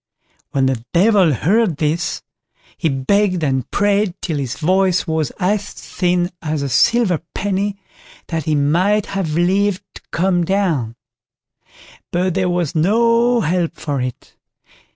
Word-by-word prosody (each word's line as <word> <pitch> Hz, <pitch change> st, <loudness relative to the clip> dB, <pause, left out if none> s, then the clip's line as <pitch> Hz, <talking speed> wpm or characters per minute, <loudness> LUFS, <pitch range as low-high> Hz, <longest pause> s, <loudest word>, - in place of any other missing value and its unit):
When 135 Hz, -1 st, +1 dB
the 130 Hz, -3 st, -1 dB
Devil 190 Hz, -1 st, +4 dB
heard 180 Hz, -, +1 dB
this, 155 Hz, +2 st, -1 dB, 0.5 s
he 160 Hz, -, -1 dB
begged 180 Hz, +6 st, +1 dB
and 130 Hz, -4 st, -1 dB
prayed 205 Hz, -2 st, +1 dB
till 160 Hz, -5 st, -3 dB
his 130 Hz, -4 st, -4 dB
voice 185 Hz, +2 st, +2 dB
was 160 Hz, -3 st, -1 dB
as 200 Hz, +2 st, -1 dB
thin 180 Hz, 0 st, -1 dB
as 155 Hz, -3 st, -2 dB
a 140 Hz, -, -2 dB
silver 190 Hz, -, +2 dB
penny 200 Hz, 0 st, -1 dB, 0.5 s
that 160 Hz, -3 st, -3 dB
he 155 Hz, -, +1 dB
might 180 Hz, +9 st, +2 dB
have 185 Hz, -6 st, -3 dB
leave 190 Hz, +3 st, +2 dB
to -, -, -12 dB
come 175 Hz, 0 st, +1 dB
down; 165 Hz, -, 0 dB, 1.2 s
but 180 Hz, +1 st, 0 dB
there 185 Hz, 0 st, 0 dB
was 175 Hz, -4 st, -1 dB
no 230 Hz, +7 st, +3 dB
help 175 Hz, -1 st, -1 dB
for 140 Hz, -4 st, -3 dB
it. 125 Hz, -1 st, -6 dB
175 Hz, 135 wpm, -18 LUFS, 155-200 Hz, 1.2 s, Devil